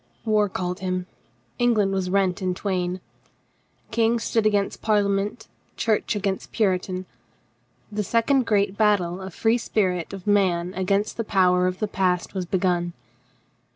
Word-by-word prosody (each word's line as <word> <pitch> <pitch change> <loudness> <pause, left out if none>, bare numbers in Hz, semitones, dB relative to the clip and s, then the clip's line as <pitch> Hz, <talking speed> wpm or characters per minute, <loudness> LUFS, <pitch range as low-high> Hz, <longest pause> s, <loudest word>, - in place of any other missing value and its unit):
War 210 -2 +2
called 180 0 -3
him. 185 -1 -2 0.5
Eng 240 -1 +3
land 200 -2 +2
was 190 -1 -1
rent 190 0 +1
in 185 -1 -1
twain. 185 -2 -2 0.9
King 230 +1 +2
stood 225 -1 +1
against 205 -2 0
Parlia 210 -2 +2
ment, 205 +3 -2 0.3
Church 220 -1 0
against 195 -2 -2
Puritan. 185 -3 0 0.9
The 210 0 -1
second 235 +4 +2
great 200 -2 +2
battle 200 -5 +2
of - - -6
the - - -16
free 230 +2 +2
spirit 185 -7 -1
of 195 -2 -8
man 185 -4 +2
against 195 +3 0
the 230 - -1
power 180 -3 +3
of 185 0 -2
the 215 - -1
past 185 -3 0
was 185 -3 -3
begun. 175 -2 0
195 Hz, 155 wpm, -24 LUFS, 185-215 Hz, 0.9 s, Eng